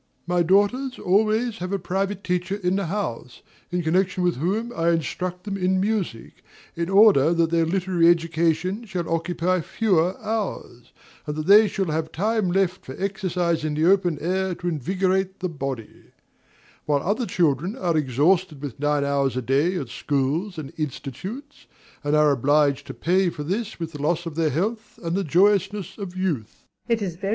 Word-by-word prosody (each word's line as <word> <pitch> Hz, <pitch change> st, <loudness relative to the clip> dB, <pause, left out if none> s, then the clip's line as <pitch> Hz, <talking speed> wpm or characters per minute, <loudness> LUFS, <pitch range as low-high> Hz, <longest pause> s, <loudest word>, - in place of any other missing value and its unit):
My 175 Hz, 0 st, +1 dB
daughters 205 Hz, +9 st, +2 dB
always 215 Hz, +4 st, +1 dB
have 180 Hz, +1 st, -4 dB
a 200 Hz, -, +1 dB
private 195 Hz, +2 st, -2 dB
teacher 180 Hz, +1 st, -1 dB
in 185 Hz, -2 st, 0 dB
the 195 Hz, -3 st, -1 dB
house, 130 Hz, -, -4 dB, 0.3 s
in 175 Hz, 0 st, -1 dB
connection 185 Hz, +3 st, +1 dB
with 175 Hz, -5 st, +1 dB
whom 210 Hz, -, -1 dB
I 165 Hz, +1 st, +1 dB
instruct 180 Hz, +2 st, -2 dB
them 200 Hz, -2 st, -4 dB
in 185 Hz, 0 st, +1 dB
music, 195 Hz, -, -3 dB, 0.3 s
in 170 Hz, +1 st, -2 dB
order 195 Hz, -7 st, +6 dB
that 165 Hz, -1 st, +2 dB
their 165 Hz, -1 st, +2 dB
literary 180 Hz, -1 st, +2 dB
education 170 Hz, +4 st, +1 dB
shall 180 Hz, -5 st, -4 dB
occupy 175 Hz, +2 st, 0 dB
fewer 185 Hz, -2 st, +1 dB
hours, 205 Hz, -, -4 dB, 0.4 s
and 150 Hz, -, -3 dB
that 155 Hz, 0 st, -3 dB
they 210 Hz, +4 st, +7 dB
shall 195 Hz, -1 st, -1 dB
have 160 Hz, 0 st, -2 dB
time 210 Hz, 0 st, 0 dB
left 185 Hz, -1 st, 0 dB
for 130 Hz, -, -8 dB
exercise 185 Hz, -4 st, -1 dB
in 155 Hz, -1 st, -1 dB
the 155 Hz, +2 st, +1 dB
open 180 Hz, -3 st, +3 dB
air 185 Hz, +2 st, -1 dB
to 175 Hz, -, -6 dB
invigorate 185 Hz, +4 st, 0 dB
the 185 Hz, -, -2 dB
body; 135 Hz, -7 st, -6 dB, 0.8 s
while 145 Hz, -2 st, +1 dB
other 220 Hz, +5 st, 0 dB
children 170 Hz, -, +1 dB
are 175 Hz, -8 st, 0 dB
exhausted 155 Hz, +4 st, +2 dB
with 140 Hz, -4 st, -7 dB
nine 145 Hz, 0 st, +1 dB
hours 140 Hz, -2 st, 0 dB
a -, -, 0 dB
day 140 Hz, +9 st, +1 dB
at 135 Hz, -8 st, -4 dB
schools 145 Hz, -, -1 dB
and 150 Hz, -4 st, -7 dB
institutes, 185 Hz, -, -6 dB, 0.4 s
and 145 Hz, +1 st, +1 dB
are 150 Hz, -1 st, +5 dB
obliged 145 Hz, +1 st, +2 dB
to -, -, -7 dB
pay 185 Hz, +2 st, +2 dB
for 150 Hz, -3 st, -6 dB
this 205 Hz, +7 st, -3 dB
with 165 Hz, -1 st, -4 dB
the 150 Hz, -3 st, -8 dB
loss 170 Hz, +3 st, 0 dB
of 165 Hz, -, -5 dB
their 160 Hz, 0 st, +1 dB
health 215 Hz, -, -3 dB
and 165 Hz, +1 st, -1 dB
the 195 Hz, -, 0 dB
joyousness 195 Hz, +3 st, +1 dB
of 185 Hz, -2 st, -6 dB
youth. 150 Hz, -, -3 dB
175 Hz, 170 wpm, -24 LUFS, 155-195 Hz, 0.8 s, they